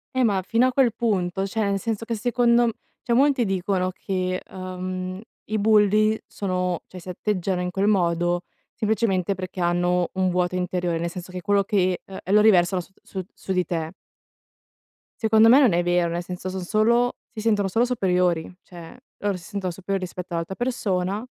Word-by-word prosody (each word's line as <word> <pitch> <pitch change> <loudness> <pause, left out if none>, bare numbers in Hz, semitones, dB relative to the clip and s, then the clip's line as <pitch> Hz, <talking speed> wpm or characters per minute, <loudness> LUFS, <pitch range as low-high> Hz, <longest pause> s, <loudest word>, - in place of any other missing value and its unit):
Eh 260 - +3
ma 200 -4 +2
fino 235 +5 +3
a 255 - -1
quel 250 -4 +3
punto, 195 -4 -1
cioè, 220 +3 -2
nel 200 -1 0
senso 225 +2 -3
che 230 0 -3
secondo 240 +1 +3
m - - +1 0.3
cioè, 240 - -1
molti 270 -1 +3
dicono 185 -1 0
che, 185 -1 -2
uhm, 185 0 -5 0.2
i 215 - -2
bulli 215 0 +4
sono 180 -3 -2
cioè, 185 - -10
si 175 - -15
atteggiano 185 0 -2
in 180 0 -2
quel 195 +2 0
modo, 175 -3 +2 0.3
semplicemente 205 -4 0
perché 185 0 -6
hanno 175 +1 +1
un 185 0 +1
vuoto 180 0 0
interiore, 180 -2 -1
nel 170 - -2
senso 180 +1 -8
che 180 - -5
quello 200 +1 +2
che 185 -2 +1
uhm, 190 - -9
e 190 - -3
lo 210 - +7
riversano 185 -3 +4
s 175 - -16
su 190 -1 -6
su 190 - -4
di 180 -1 +2
te. 165 -1 -3 1.3
Secondo 220 +1 +6
me 260 - +8
non 250 -10 +5
è 175 +1 +2
vero, 175 -1 +2
nel 170 +1 -3
senso, 180 +1 -6
son 185 0 -4
solo 235 +5 +2
si 225 -2 -7
sentono 210 -3 +2
solo 225 +6 +2
superiori. 180 -8 +1
Cioè, 175 +5 -12 0.2
loro 200 -2 -1
si 175 - -13
sentono 190 0 -4
superiori 195 +2 -3
rispetto 180 0 -6
all'altra 170 +3 -3
persona. 200 -5 -1
190 Hz, 190 wpm, -24 LUFS, 180-215 Hz, 1.3 s, me